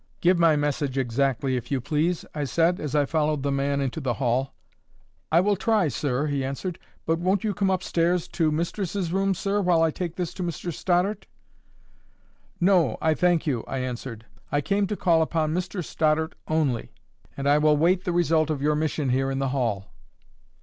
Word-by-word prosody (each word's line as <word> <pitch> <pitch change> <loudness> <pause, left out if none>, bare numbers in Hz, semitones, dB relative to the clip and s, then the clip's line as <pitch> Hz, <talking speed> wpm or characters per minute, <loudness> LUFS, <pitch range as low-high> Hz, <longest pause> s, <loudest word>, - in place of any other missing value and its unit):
"Give 175 0 +3
my 165 -2 +5
message 145 -2 -1
exactly, 135 +1 0
if 125 -1 -4
you 140 - 0
please," 155 +7 -1
I 150 - -2
said, 165 +7 +1
as 150 -1 -4
I 145 -1 +3
followed 150 -1 0
the 140 - 0
man 140 0 0
into 135 +3 -3
the 125 -4 -1
hall. 130 +1 -1 0.8
"I 165 +2 +5
will 205 +2 +2
try, 210 -4 +1
sir," 140 0 -1
he 140 -2 -1
answered. 140 +7 -4 0.3
"But 165 +1 +1
won't 185 +2 +1
you 215 -2 0
come 195 -1 0
up 185 -1 0
stairs 170 0 +1
to 160 -3 +1
mistress's 175 +2 -2
room, 195 0 +1
sir, 200 +3 0
while 175 -3 +3
I 160 - +2
take 175 0 -4
this 180 -3 -3
to - - -7
Mr 170 0 -4
Stoddart?" 180 +6 0 1.3
"No, 175 - +3
I 160 0 +2
thank 175 0 +2
you," 130 -7 -1
I 135 - -3
answered. 125 -3 -5 0.3
"I 145 - +2
came 200 +6 0
to 210 - -3
call 170 -3 +3
upon 160 -1 0
Mr 180 0 -3
Stoddart 160 +1 0
only, 150 -7 -1 0.4
and 140 0 -2
I 145 +1 +5
will 150 0 +4
wait 175 +4 +2
the 180 - -1
result 165 -2 +2
of 155 -3 -1
you 150 +2 +1
mission 150 -2 -1
here 135 +2 +1
in 135 - -2
the 135 0 0
hall." 115 -7 -2
155 Hz, 195 wpm, -25 LUFS, 140-175 Hz, 1.3 s, my